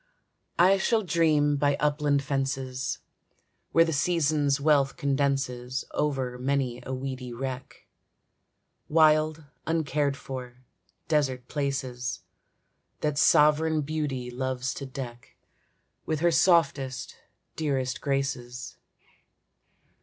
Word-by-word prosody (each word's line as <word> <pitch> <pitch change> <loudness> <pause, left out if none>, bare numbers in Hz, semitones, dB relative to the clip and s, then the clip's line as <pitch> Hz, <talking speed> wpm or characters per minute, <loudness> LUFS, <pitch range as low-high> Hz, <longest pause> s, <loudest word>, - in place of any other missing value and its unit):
I 190 +3 +5
shall 220 +2 +2
dream 155 -5 +2
by 145 0 +2
upland 145 -1 +1
fences, 135 -1 -2 0.7
Where 165 0 +5
the 165 - -1
season's 150 -2 +1
wealth 140 -2 +3
condenses 135 -4 -1
Over 130 -4 -1
many 130 -2 -1
a - - -4
weedy 130 -1 -4
wreck, 130 +1 -6 1.0
Wild, 155 0 +4 0.2
uncared 150 -3 0
for, 125 -2 -8 0.4
desert 135 -5 0
places, 130 -4 -3 0.8
That 150 -1 0
sovereign 155 +1 +4
Beauty 140 -4 -3
loves 130 0 -2
to 140 - -6
deck 125 -3 -8 0.7
With 155 -1 -1
her 170 0 +4
softest, 155 -6 +2 0.4
dearest 135 -5 -1
graces. 130 -3 -3
140 Hz, 95 wpm, -27 LUFS, 130-150 Hz, 1.0 s, I